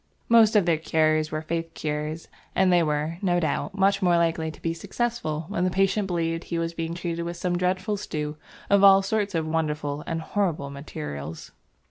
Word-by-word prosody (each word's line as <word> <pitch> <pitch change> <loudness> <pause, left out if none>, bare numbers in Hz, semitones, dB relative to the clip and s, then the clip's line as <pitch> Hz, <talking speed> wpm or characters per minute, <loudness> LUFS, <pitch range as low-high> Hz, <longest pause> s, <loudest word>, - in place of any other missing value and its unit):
Most 225 -1 +6
of 205 -4 +5
their 165 -3 +2
cures 155 -1 +1
were 155 0 -3
faith 165 +1 -3
cures, 150 +1 -3 0.3
and 185 -1 +4
they 175 - +5
were, 155 +1 -1
no 175 -3 +2
doubt, 175 +5 -2
much 195 +1 +3
more 175 -2 +4
likely 165 -1 +1
to 155 - -11
be 165 - 0
successful 165 -4 -3
when 180 -2 -1
the 185 - +2
patient 195 +2 +1
believed 165 -2 -1
he 170 - -3
was 165 0 -2
being 165 0 -3
treated 170 -1 -3
with 170 0 -5
some 175 0 -1
dreadful 185 +3 0
stew 150 -6 -4 0.3
of 200 0 +4
all 195 0 +8
sorts 200 -1 -1
of 160 -1 0
wonderful 150 -2 -2
and 165 0 -2
horrible 160 -7 -1
materials. 75 - -7
165 Hz, 190 wpm, -25 LUFS, 155-190 Hz, 0.3 s, all